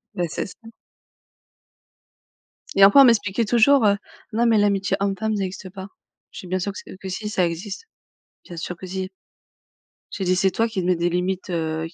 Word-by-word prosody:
Beh, 175 -1 -1
c'est - - -3
ça. - - -13 2.2
Et 195 - +6
enfant, 205 +8 +8
on - - +9
m'expliquait 230 -2 +2
toujours, 240 +3 +4
heu: 200 0 +4 0.4
«Non, 235 +2 +2
mais 225 -2 +4
l'amitié 200 -1 +1
homme-femme 200 +2 -1
ça 200 - -1
existe 185 0 -6
pas». 190 +1 -9 0.4
Je - - -9
fais: 185 - -11
«Bien 185 +1 -1
sûr 200 +3 -2
que - - -8
s - - -9
que 190 - -7
si 210 +3 -4
ça 185 -4 +1
existe. 195 - -5 0.6
Bien 175 - -10
sûr 180 +1 -5
que 185 - -9
si». 185 0 -4 1.0
J'ai 195 - -4
dit: 185 0 +2
«C'est 190 +1 +2
toi 225 +5 +1
qui 220 -5 -3
te - - -4
mets 180 -1 +3
des 170 +1 0
limites, 185 +2 -2
heu, 160 -1 -2
qu 165 - -17
190 Hz, 205 wpm, -22 LUFS, 180-210 Hz, 2.2 s, on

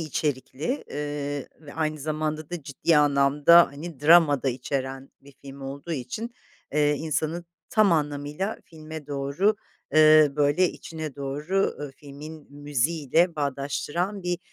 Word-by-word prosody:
içerikli, 145 - -3
eee, 145 -1 -4
ve 145 -2 -12
aynı 155 -1 -1
zamanda 155 +1 -3
da 175 -4 -5
ciddi 145 +4 +1
anlamda, 145 +3 +5
hani, 150 0 -9
drama 150 -3 +6
da 135 - +1
içeren 135 +1 -4
bir 140 0 -17
film 140 0 -10
olduğu 140 +5 -6
için, 220 - -5 0.4
eee, 150 0 +3
insanın 160 +3 -2 0.3
tam 215 -5 +4
anlamıyla 150 +5 -2
filme 155 -2 -10
doğru, 145 +9 0 0.4
eee, 155 -2 +7
böyle 150 +5 +3
içine 160 -3 -7
doğru, 150 +8 -1
ııı, 145 -2 -5
filmin 150 +1 -11
müziğiyle 145 +4 +1
bağdaştıran 150 +7 -2
bir, 175 -1 -1
150 Hz, 130 wpm, -25 LUFS, 140-160 Hz, 0.4 s, eee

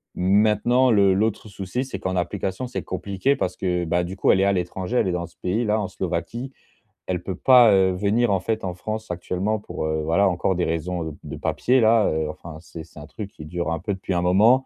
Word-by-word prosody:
Maintenant, 105 +7 +3
le 100 -3 +4
l'autre 110 +2 -1
souci, 100 +6 -4
c'est 130 - -6
qu'en 95 0 -2
application, 95 +5 -2
c'est 125 - -4
compliqué 100 +8 -1
parce 90 - -3
que, 90 -2 -1
bah, 85 +2 +1
du 90 +2 -6
coup, - - +3
elle 95 - +3
est 95 - +3
à 100 - +3
l'étranger. 90 +5 -2
Elle - - +2
est - - 0
dans 85 0 -3
ce - - -23
pays-là 105 +3 0
en 105 - -2
Slovaquie. 95 +9 -4 0.6
Elle 90 -1 -2
peut 95 0 -4
pas, 120 +2 +6
heu, 95 -1 +4
venir, 105 +4 +1
en 95 - +2
fait, 110 +4 -2
en 90 -2 -3
France 110 +4 -5
actuellement 90 +4 -2
pour, 100 - -5
heu, 80 0 -1
voilà, 95 +6 +3
encore 90 +1 0
des 90 - 0
raisons 85 +1 -2
heu, 75 - -11
de - - -7
papiers-là, 115 -3 +3
heu. 80 0 -1
Enfin, 80 -2 -9
c'est 80 -1 -10
c'est 75 - -14
un 75 - -10
truc 105 +3 -8
qui 75 - -11
dure 85 +1 -3
un 85 - -2
peu 100 +4 -3
depuis 95 0 -4
un 85 - +1
moment 110 +9 +4
95 Hz, 235 wpm, -23 LUFS, 90-110 Hz, 0.6 s, pas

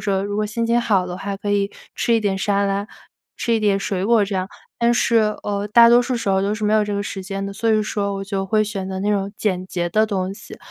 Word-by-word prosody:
说 195 -2 0
如 205 0 -3
果 215 - 0
心 230 +2 -2
情 235 +1 +2
好 195 -5 +1
的 180 - -5
话 195 +1 -4
可 205 +1 -4
以 200 0 +1 0.2
吃 235 - 0
一 225 - +3
点 200 -2 0
沙 200 0 +1
拉， 200 +1 -1 0.5
吃 235 - 0
一 225 - +1
点 205 -2 +2
水 195 -1 -2
果 230 -1 +4
这 200 - -5
样。 185 0 -2 0.3
但 235 0 +3
是， 235 -1 +2 0.3
呃， 205 0 -2
大 235 +3 +7
多 240 +1 +6
数 245 0 -1
时 230 - -3
候 190 0 +3
都 200 +2 0
是 215 - -7
没 210 - +2
有 215 -1 +4
这 205 0 -3
个 200 - -1
时 200 -1 -5
间 195 +1 -5
的， 200 - -5
所 225 +3 -2
以 215 -1 +3
说 200 -1 -2
我 195 - -4
就 195 -1 -3
会 215 +2 +2
选 200 -3 -4
择 190 0 -4
那 205 +2 0
种 200 -1 -1
简 185 -3 -1
洁 175 -2 -2
的 215 +4 +3
东 190 -2 -2
西。 200 - -11
205 Hz, 305 characters per minute, -21 LUFS, 195-215 Hz, 0.5 s, 大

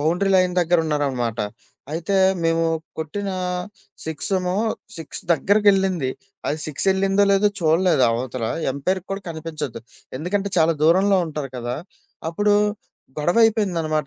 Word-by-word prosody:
Boundary 175 +6 +1
line 180 -1 +2
దగ్గరున్నారనమాట. 145 -9 0 0.5
అయితే 175 +5 -1 0.3
మేము 165 0 +2 0.3
కొట్టిన 195 +6 -3 0.7
6 160 +4 -4
ఏమో 180 0 -2 0.4
6 160 - -6
దగ్గరికెళ్ళింది. 195 -6 +3 0.4
అది 150 - -1
6 155 +5 -3
ఎళ్ళిందో, 195 +1 +2
లేదో 200 +1 +4
చూడలేదు 165 -2 +3
అవతల 120 0 -3 0.3
ఎంపైర్‌కి 185 +7 -2
కూడా 195 0 -3
కనిపించదు 155 -6 -5 0.4
ఎందుకంటే 195 +5 -1
చాలా 165 0 +4
దూరంలో 190 +5 +4
ఉంటారు 150 -4 -5
కదా! 120 +1 -3 0.5
అప్పుడు 205 +5 +2 0.6
గొడవ 175 +7 +1
అయిపోయిందనమాట. 170 -9 +1
165 Hz, 115 wpm, -22 LUFS, 150-195 Hz, 0.7 s, లేదో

